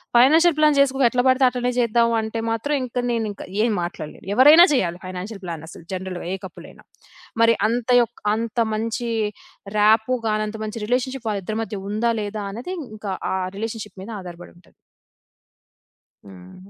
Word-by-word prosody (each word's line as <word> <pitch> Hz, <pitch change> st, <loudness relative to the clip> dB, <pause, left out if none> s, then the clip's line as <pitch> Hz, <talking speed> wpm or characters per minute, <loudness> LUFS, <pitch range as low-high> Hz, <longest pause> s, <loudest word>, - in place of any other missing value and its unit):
Financial 315 Hz, +7 st, +6 dB
plan 305 Hz, -1 st, +4 dB
చేసుకో 275 Hz, -1 st, +3 dB
ఎట్లా 245 Hz, +1 st, +1 dB
పడితే 260 Hz, 0 st, +4 dB
అట్లనే 250 Hz, 0 st, -2 dB
చేద్దాం 235 Hz, 0 st, +3 dB
అంటే 220 Hz, +1 st, -4 dB
మాత్రం 230 Hz, +7 st, -1 dB
ఇంకా 250 Hz, 0 st, -3 dB
నేనింక 220 Hz, -3 st, -3 dB, 0.2 s
ఏం 230 Hz, 0 st, +2 dB
మాట్లాడలేను. 170 Hz, -3 st, -7 dB
ఎవరైనా 295 Hz, +8 st, +8 dB
చేయాలి, 175 Hz, -9 st, 0 dB
ఫైనాన్షియల్ 185 Hz, +3 st, -7 dB
ప్లాన్ 165 Hz, -3 st, -6 dB
అసలు 170 Hz, -, -12 dB
జనరల్‌గా 185 Hz, -1 st, -5 dB
ఏ -, -, -1 dB
కపులయినా. 180 Hz, -, -12 dB, 0.6 s
మరి 230 Hz, 0 st, +6 dB, 0.2 s
అంత 240 Hz, +1 st, -2 dB
యోక్ 235 Hz, -, -4 dB
అంత 230 Hz, +1 st, -4 dB, 0.2 s
మంచి 230 Hz, +2 st, -2 dB, 0.7 s
ర్యాపొ 220 Hz, +4 st, +4 dB
గాని, 215 Hz, 0 st, 0 dB
అంత 220 Hz, +1 st, -6 dB
మంచి 215 Hz, 0 st, -5 dB
రిలేషన్‌షిప్ 250 Hz, +1 st, -2 dB
వాళ్ళ 205 Hz, -2 st, -2 dB
ఇద్దరి 215 Hz, +3 st, -3 dB
మధ్య 210 Hz, -2 st, -6 dB
ఉందా 225 Hz, +3 st, +1 dB
లేదా 205 Hz, 0 st, -4 dB
అనేది 245 Hz, -, -6 dB, 0.2 s
ఇంకా 205 Hz, -2 st, -5 dB, 0.2 s
ఆ -, -, 0 dB, 0.2 s
రిలేషన్‌షిప్ 215 Hz, -2 st, -6 dB
మీద 215 Hz, -, -10 dB
ఆధారపడుంటది. 175 Hz, -1 st, -12 dB, 1.5 s
హ్మ్. 95 Hz, -, -14 dB
220 Hz, 155 wpm, -22 LUFS, 200-245 Hz, 1.5 s, ఎవరైనా